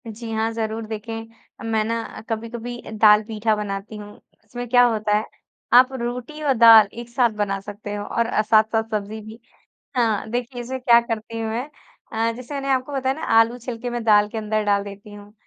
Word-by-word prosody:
जी, 225 +1 -7
हाँ, 220 +1 0
ज़रूर 225 0 -3
देखें 225 +1 -8
मैं 220 -1 +2
ना 230 0 -4
कभी-कभी 235 +2 -5 0.2
दाल-पीठा 215 +1 +4
बनाती 205 0 -5
हूँ, 205 0 -10 0.3
उसमें 245 +3 -7
क्या 245 0 +6
होता 215 -3 +2
है 215 - -2 0.5
आप 255 +2 +7
रोटी 250 +5 -5
और 280 -2 +3
दाल 225 -3 +8
एक 235 0 -8
साथ 240 0 +2
बना 195 -1 0
सकते 205 +1 -8
हो 205 - -4
और 235 - 0
अ, 230 -2 +1
साथ-साथ 220 +1 +3
सब्ज़ी 215 +1 -3
भी। 220 +2 -11 0.6
हाँ, 220 -3 +1
देखिए 245 +1 -3
इसमें 260 +2 -5
क्या 235 -2 +6
करती 230 -1 -5
हूँ 225 -1 -2
मैं, 235 +3 -2 0.5
अ, 225 +1 0
जैसे 255 +3 -8
मैंने 275 -1 -3
आपको 260 +2 0
बताया 265 -1 0
ना 315 - -9 0.2
आलू 230 +2 +1
छिल 240 -1 -6
के 245 +1 -4
मैं 240 0 -3
दाल 210 -2 +5
के 225 - -5
अंदर 215 0 -1
डाल 200 -1 +2
देती 200 +1 -11
हूँ, 205 0 -13
225 Hz, 200 wpm, -22 LUFS, 215-240 Hz, 0.6 s, दाल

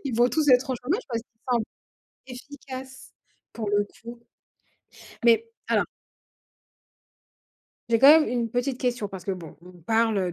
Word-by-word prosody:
Ils 265 -4 -2
vont 240 +1 +4
tous 305 +2 0
être 255 +1 +4
au - - 0
chômage 295 - -2
parce 230 -2 -2
qu'il 225 -1 -48
semble 235 -3 +2 0.6
efficace 265 0 -10 0.4
pour 220 -3 -4
le 205 0 +2 0.2
coup 235 +1 -9 1.1
mais 235 - +4 0.2
alors - - +2 2.0
J'ai 230 -1 +3
quand 270 - +8
même 305 - 0
une 240 -2 -1
petite 245 +2 -2
question 245 -5 -1
parce 190 -2 -9
que, 195 - -1
bon, 170 -4 -9
on 180 +1 -14
parle 215 -1 +1
240 Hz, 150 wpm, -25 LUFS, 220-260 Hz, 2.0 s, quand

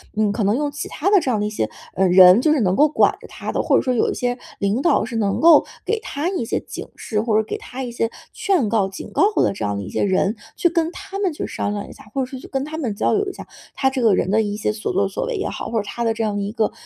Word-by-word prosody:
嗯， 215 -1 +2
可 205 0 -1
能 205 +3 +2
用 290 +2 -1
其 290 - -5
他 345 +6 -1
的 405 - +7
这 285 - -2
样 220 -4 +1
的 - - 0
一 - - -1
些， 210 - -2 0.3
呃， 190 +1 +3
人， 180 +2 +8
就 305 +5 +3
是 295 - +1
能 185 -2 +1
够 300 - +6
管 305 - +3
着 - - -12
他 - - -6
的， - - 0
或 - - +2
者 - - +4
说 255 - 0
有 235 - +2
一 - - -1
些 245 0 -2 0.2
领 200 +5 0
导 320 -1 +3
是 230 +1 -4
能 200 -3 0
够 325 -2 +7 0.2
给 450 - 0
他 325 - -3
一 370 -11 -2
些 - - -2
警 - - -8
示， 215 - -3
或 220 -1 +1
者 220 - +3
给 320 - -4
他 265 -12 -7
一 245 - -5
些 230 -1 -1 0.2
劝 345 - +1
告、 205 -3 +2
警 195 - -9
告 - - 0 0.2
的 - - +2
这 195 - -4
样 100 0 -1
的 100 - -4
一 - - -7
些 - - -2
人。 195 +2 +1 0.2
去 345 - +2
跟 335 -1 0
他 395 +1 -7
们 380 -5 0
去 - - -4
商 205 - -3
量 205 -1 -5
一 - - -10
下， - - -14
或 270 - 0
者 - - 0
说 260 0 -8
去 - - -11
跟 270 -1 -2
他 305 +2 -6
们 240 -10 -2
交 205 - +1
流 405 -1 +1
一 - - -7
下， - - -9 0.3
他 265 - +2
这 265 -1 -3
个 220 -5 +4
人 185 - 0
的 220 +2 +4
一 205 -1 -2
些 210 - -1
所 215 0 -4
作 195 +1 +1
所 195 - -3
为 - - -3
也 400 - -2
好， - - -5
或 230 - -2
者 - - -8
他 235 +3 -4
的 225 - +2
这 225 - -2
样 210 -2 -1
一 200 0 -3
个， 225 -2 0
230 Hz, 345 characters per minute, -21 LUFS, 205-300 Hz, 0.3 s, 人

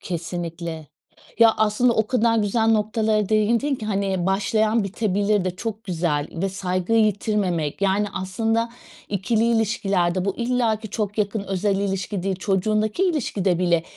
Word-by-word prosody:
Kesinlikle. 170 -2 -5 0.5
Ya, 225 -1 +6
aslında, 220 +3 +2
o 220 -1 +1
kadar 230 -2 +2
güzel 220 +2 +1
noktalara 215 -1 +1
değindin 230 +6 +2
ki, 220 -4 -6
hani, 195 -3 -1
başlayan 215 +3 +1
bitebilir 205 0 0
de, 185 0 -3
çok 225 +1 -5
güzel, 160 -5 -1
ve 190 +3 -2
saygıyı 190 +3 +1
yitirmemek 195 -6 -1
yani 200 +2 +2
aslında, 225 +5 -1 0.4
ikili 215 +3 0
ilişkilerde, 195 -5 +1
bu 195 - -2
illa 235 -2 +1
ki 220 -2 -10
,çok 210 -1 -3
yakın, 205 0 0
özel 195 +1 0
ilişki 195 -1 -2
değil. 190 -1 -1
Çocuğundaki 215 - 0
ilişkide 205 - 0
bile, 170 -2 +2
205 Hz, 140 wpm, -23 LUFS, 185-220 Hz, 0.5 s, Ya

